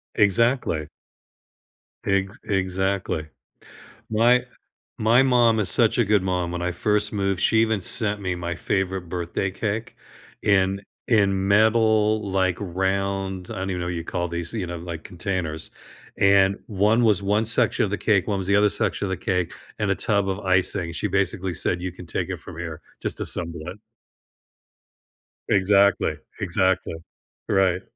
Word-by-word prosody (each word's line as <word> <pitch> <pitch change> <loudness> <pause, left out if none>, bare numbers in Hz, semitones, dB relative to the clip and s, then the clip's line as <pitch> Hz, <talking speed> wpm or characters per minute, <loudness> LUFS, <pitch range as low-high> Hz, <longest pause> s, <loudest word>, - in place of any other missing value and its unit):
Exactly. 115 +5 +2 1.2
Ex 100 -2 0
exactly. 95 -4 -1 0.8
My 120 +3 +4 0.5
my 115 +4 +4
mom 120 -4 +4
is 105 - 0
such 115 0 +3
a 120 - +3
good 105 -2 +2
mom. 90 -2 -1
When 90 0 -4
I 90 - -1
first 105 +4 +1
moved, 100 -2 0
she 110 - +3
even 110 -3 +1
sent 105 +1 +2
me 90 -2 -2
my 85 0 -4
favorite 95 -1 -2
birthday 90 +2 -2
cake 110 +3 -4 0.5
in 95 -1 +2 0.3
in 100 -4 +2
metal, 110 0 +3
like, 95 -2 +1
round- 95 0 -2
I - - -5
don't 95 +1 -3
even 90 - -3
know 85 - -3
what 90 - -2
you 85 - -4
call 90 +1 -2
these- 85 +1 -5
you 105 -5 -2
know, 85 0 -5
like, 85 -1 -7
containers, 90 -4 -4 0.5
and 100 0 +4
one 105 +3 +2
was 105 -4 +3
one 105 +3 +1
section 115 - +2
of - - -5
the - - -1
cake, - - +1
one 100 - 0
was 95 - -4
the 100 - +3
other 105 0 +4
section 100 - -1
of - - -3
the 95 - -2
cake, 90 -1 -1 0.3
and - - +1
a - - +1
tub 100 -2 0
of 95 +1 -2
icing, 95 -2 +1
she 95 +5 -2
basically 95 -1 0
said, 90 +1 0
"You 90 0 -3
can 90 0 -11
take - - -3
it - - -3
from - - -11
here, 80 -1 -6 0.2
just - - -4
assemble 85 -2 -3
it". 90 +3 -7 1.7
Exactly, 100 0 +3 0.2
exactly. 95 -1 0 0.5
Right. 95 -1 +2
95 Hz, 165 wpm, -23 LUFS, 90-105 Hz, 1.7 s, My